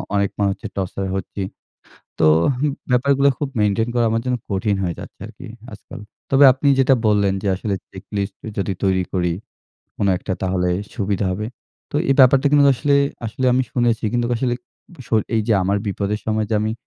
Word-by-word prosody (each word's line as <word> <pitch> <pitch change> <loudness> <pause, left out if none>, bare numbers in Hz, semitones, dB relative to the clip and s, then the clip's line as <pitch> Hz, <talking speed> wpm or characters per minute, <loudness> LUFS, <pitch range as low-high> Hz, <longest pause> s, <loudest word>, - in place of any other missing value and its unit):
অনেক 100 -1 +2
মানুষ 100 -1 +2
হচ্ছে - - -8
টর্চার 95 0 -3
হচ্ছি। 95 +1 -5 0.8
তোহ 80 -1 +5 0.6
ব্যাপারগুলো 140 +3 +3
খুব 145 - -2
মেইনটেইন 105 +2 +1
করা 120 -1 +2
আমার 115 +1 +1
জন্য 125 -1 0
কঠিন 100 +1 0
হয়ে 90 -2 -1
যাচ্ছে - - -12
আরকি - - -12 0.3
আজকাল। 105 - -11 0.3
তবে 135 +1 +6
আপনি 135 +2 0
যেটা 135 0 +5
বললেন 100 -2 +3
যে - - -4
আসলে 100 +2 -2 0.2
চেকলিস্ট 100 +1 -5 0.2
যদি 100 0 -1
তৈরি 95 -1 +2
করি, 90 -2 0 0.6
কোন 100 - 0
একটা 95 - -4
তাহলে 90 -1 0 0.2
সুবিধা 100 -2 -1
হবে। 105 +4 -3 0.4
তো - - -2
এই - - +5
ব্যাপারটা 130 +2 +6
কিন্তু 145 -1 +5
আসলে 140 +3 +1 0.3
আসলে 115 +4 -4
আমি 130 +1 +3
শুনেছি। 120 -4 +1
কিন্তু 120 -1 0
আসলে 120 +1 0 0.5
সই 110 - +2
এই 110 - +3
যে - - +4
আমার 100 +2 +1
বিপদের 100 +1 -2
সময় 110 0 0
যে - - +1
আমি 110 +1 -1
105 Hz, 180 wpm, -20 LUFS, 100-125 Hz, 0.8 s, তবে